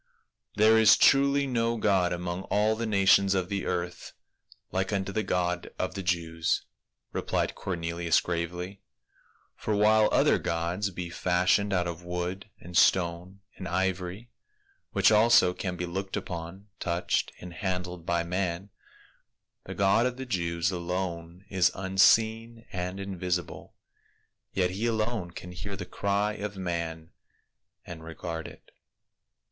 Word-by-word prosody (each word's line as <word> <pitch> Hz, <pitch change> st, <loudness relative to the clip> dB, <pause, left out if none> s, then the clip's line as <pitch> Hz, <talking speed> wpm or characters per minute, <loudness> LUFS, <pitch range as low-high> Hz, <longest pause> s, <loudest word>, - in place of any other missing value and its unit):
"There 110 Hz, +2 st, +6 dB
is 110 Hz, -, +7 dB
truly 140 Hz, 0 st, +4 dB
no 115 Hz, -3 st, 0 dB
god 95 Hz, -5 st, +2 dB
among 90 Hz, +1 st, -3 dB
all 105 Hz, +2 st, +2 dB
the 115 Hz, +1 st, -3 dB
nations 100 Hz, -1 st, +4 dB
of 90 Hz, -1 st, -1 dB
the 100 Hz, -1 st, -2 dB
earth 90 Hz, 0 st, -3 dB, 0.6 s
like 95 Hz, +1 st, -1 dB
unto 100 Hz, -1 st, -1 dB
the 110 Hz, -, 0 dB
God 90 Hz, -3 st, -1 dB
of 95 Hz, -, -2 dB
the 100 Hz, -, -4 dB
Jews," 85 Hz, -2 st, 0 dB, 0.5 s
replied -, -, -1 dB
Cor 95 Hz, -, -4 dB
nelius 85 Hz, 0 st, +1 dB
gravely, 90 Hz, +3 st, -4 dB, 0.4 s
" -, -, -36 dB
for 105 Hz, -, 0 dB
while 105 Hz, +1 st, +5 dB
other -, -, +4 dB
gods 85 Hz, +5 st, -1 dB
be 90 Hz, -2 st, -6 dB
fashioned 90 Hz, +4 st, +2 dB
out 90 Hz, -2 st, +1 dB
of 85 Hz, 0 st, -5 dB
wood 90 Hz, +3 st, -4 dB
and 85 Hz, +1 st, -11 dB
stone 90 Hz, +2 st, +2 dB, 0.2 s
and 95 Hz, -, -6 dB
ivory 95 Hz, +4 st, -2 dB, 0.3 s
— 395 Hz, -1 st, -40 dB
which -, -, +5 dB
also 105 Hz, -4 st, +5 dB
can 90 Hz, -1 st, -4 dB
be 90 Hz, 0 st, -3 dB
looked 95 Hz, +3 st, -4 dB
upon, 85 Hz, +3 st, -6 dB
touched 85 Hz, 0 st, -1 dB
and 90 Hz, -1 st, -9 dB
handled 90 Hz, -2 st, -3 dB
by 85 Hz, 0 st, 0 dB
man, 90 Hz, +2 st, -2 dB, 0.9 s
the -, -, -7 dB
God 100 Hz, +5 st, +3 dB
of 125 Hz, 0 st, -5 dB
the 130 Hz, -, -5 dB
Jews 85 Hz, -4 st, -1 dB
alone 90 Hz, 0 st, -4 dB
is 95 Hz, -3 st, +3 dB
unseen 110 Hz, +4 st, +2 dB
and 90 Hz, +1 st, -3 dB
invisible, 90 Hz, -3 st, -4 dB, 0.8 s
yet 90 Hz, -2 st, +1 dB
he 105 Hz, +6 st, -1 dB
alone 110 Hz, -4 st, -1 dB
can 90 Hz, +1 st, -9 dB
hear 95 Hz, +3 st, -6 dB
the 100 Hz, -, -6 dB
cry 100 Hz, +1 st, 0 dB
of 105 Hz, -1 st, -5 dB
man 85 Hz, -3 st, -4 dB, 0.7 s
and 80 Hz, -2 st, -9 dB
regard 80 Hz, 0 st, -6 dB
it." -, -, -15 dB
95 Hz, 145 wpm, -28 LUFS, 85-100 Hz, 0.9 s, is